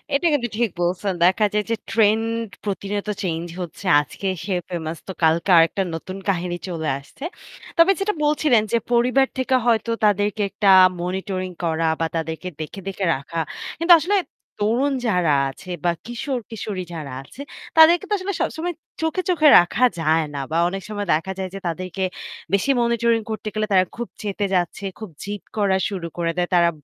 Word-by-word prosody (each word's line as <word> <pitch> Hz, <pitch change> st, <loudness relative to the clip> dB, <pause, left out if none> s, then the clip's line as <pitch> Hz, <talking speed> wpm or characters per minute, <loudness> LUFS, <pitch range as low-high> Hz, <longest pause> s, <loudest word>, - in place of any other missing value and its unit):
এটা 285 Hz, -, 0 dB
কিন্তু 250 Hz, -5 st, +1 dB
ঠিক 235 Hz, -2 st, +2 dB
বলছেন। 185 Hz, +3 st, 0 dB
দেখা 200 Hz, +4 st, +4 dB
যায় 210 Hz, -, +1 dB
যে -, -, +3 dB, 0.2 s
ট্রেন্ড 225 Hz, +1 st, +2 dB, 0.2 s
প্রতিনিয়ত 200 Hz, +1 st, -3 dB, 0.2 s
চেঞ্জ 165 Hz, -2 st, -2 dB, 0.2 s
হচ্ছে। 175 Hz, +2 st, -8 dB, 0.2 s
আজকে 195 Hz, +6 st, -6 dB, 0.2 s
সে 195 Hz, -, -1 dB, 0.2 s
ফেমাস 165 Hz, -2 st, -4 dB
তো -, -, -4 dB
কালকে 165 Hz, +4 st, +3 dB
আরেকটা 165 Hz, +4 st, +4 dB
নতুন 185 Hz, +4 st, -7 dB
কাহিনী 175 Hz, -1 st, -1 dB
চলে 160 Hz, -3 st, -3 dB
আসছে। 140 Hz, -, -14 dB, 0.5 s
তবে 335 Hz, +3 st, +7 dB
যেটা 405 Hz, +2 st, 0 dB
বলছিলেন 295 Hz, -6 st, +3 dB
যে 235 Hz, -, +4 dB
পরিবার 250 Hz, +3 st, +3 dB
থেকে 260 Hz, 0 st, +1 dB
হয়তো 230 Hz, -1 st, +2 dB
তাদেরকে 205 Hz, 0 st, +1 dB
একটা 200 Hz, 0 st, +1 dB, 0.3 s
মনিটরিং 185 Hz, 0 st, -3 dB
করা 165 Hz, -1 st, +1 dB
বা 165 Hz, -, +1 dB
তাদেরকে 160 Hz, +1 st, -3 dB
দেখে, 155 Hz, +5 st, -6 dB
দেখে 195 Hz, 0 st, -2 dB
রাখা। 140 Hz, +5 st, -5 dB, 0.4 s
কিন্তু 335 Hz, +1 st, +7 dB
আসলে 370 Hz, +7 st, 0 dB, 0.5 s
তরুণ 255 Hz, +7 st, +2 dB
যারা 180 Hz, -7 st, +2 dB, 0.2 s
আছে 180 Hz, +7 st, -12 dB, 0.2 s
বা 175 Hz, -, +4 dB
কিশোর-কিশোরী 230 Hz, -5 st, -4 dB
যারা 150 Hz, -5 st, -6 dB
আছে 265 Hz, -, -12 dB, 0.4 s
তাদেরকে 330 Hz, +4 st, +7 dB
তো 420 Hz, -, +1 dB
আসলে 395 Hz, +1 st, -3 dB
সবসময় 345 Hz, +2 st, -2 dB, 0.3 s
চোখে, 320 Hz, +3 st, 0 dB
চোখে 310 Hz, -4 st, +4 dB
রাখা 175 Hz, +8 st, +1 dB, 0.2 s
যায় 160 Hz, 0 st, +2 dB
না। 140 Hz, -, -4 dB
বা 165 Hz, -, +1 dB
অনেক 195 Hz, +2 st, -4 dB
সময় 205 Hz, -1 st, -3 dB
দেখা 165 Hz, +5 st, -1 dB
যায় 190 Hz, -1 st, -3 dB
যে -, -, -5 dB
তাদেরকে 185 Hz, +2 st, -3 dB, 0.5 s
বেশি 200 Hz, +8 st, +3 dB
মনিটরিং 235 Hz, -1 st, +2 dB
করতে 215 Hz, 0 st, -5 dB
গেলে 215 Hz, 0 st, 0 dB
তারা 185 Hz, -1 st, +5 dB
খুব 240 Hz, -, -3 dB, 0.2 s
চেতে 205 Hz, 0 st, -2 dB
যাচ্ছে, 175 Hz, +2 st, -1 dB, 0.2 s
খুব 215 Hz, -2 st, -7 dB
জিদ 205 Hz, 0 st, -5 dB, 0.2 s
করা 195 Hz, -2 st, +2 dB
শুরু 185 Hz, -5 st, -4 dB
করে 170 Hz, -1 st, 0 dB
দেয়। 175 Hz, 0 st, 0 dB
তারা 170 Hz, -1 st, +5 dB
200 Hz, 170 wpm, -22 LUFS, 175-235 Hz, 0.5 s, তবে